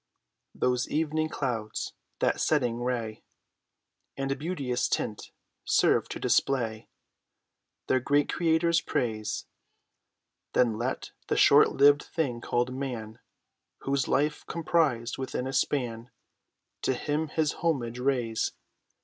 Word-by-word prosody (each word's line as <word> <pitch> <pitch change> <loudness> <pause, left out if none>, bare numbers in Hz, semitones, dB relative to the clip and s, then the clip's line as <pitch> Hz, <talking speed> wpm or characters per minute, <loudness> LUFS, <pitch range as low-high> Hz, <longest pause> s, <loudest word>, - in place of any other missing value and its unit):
Those 125 0 +1
evening 155 0 0
clouds, 115 -8 -3 0.3
that - - +2
setting 125 -6 +1
ray, 115 -3 -2 1.0
And 135 0 -1
beauteous 145 -7 -1
tint, 105 - -2 0.3
serve - - +3
to - - -5
display 115 -5 +1 1.0
Their 130 - +2
great 145 +3 +2
Creator's 165 0 +2
praise; 110 -7 -2 1.1
Then 120 -3 +3
let 125 +3 -3 0.2
the - - 0
short - - +6
lived 145 0 +6
thing 130 -8 -2
called 120 +1 0
man, 120 -5 -5 0.6
Whose 135 -1 0
life's 150 +2 +1
comprised 155 -9 0
within 130 -1 -3
a 135 - -4
span, 125 -3 -1 0.7
To 130 - +1
Him 150 +4 -1
his 155 -1 0
homage 125 -8 0
raise. 125 -4 0
130 Hz, 110 wpm, -28 LUFS, 120-150 Hz, 1.1 s, short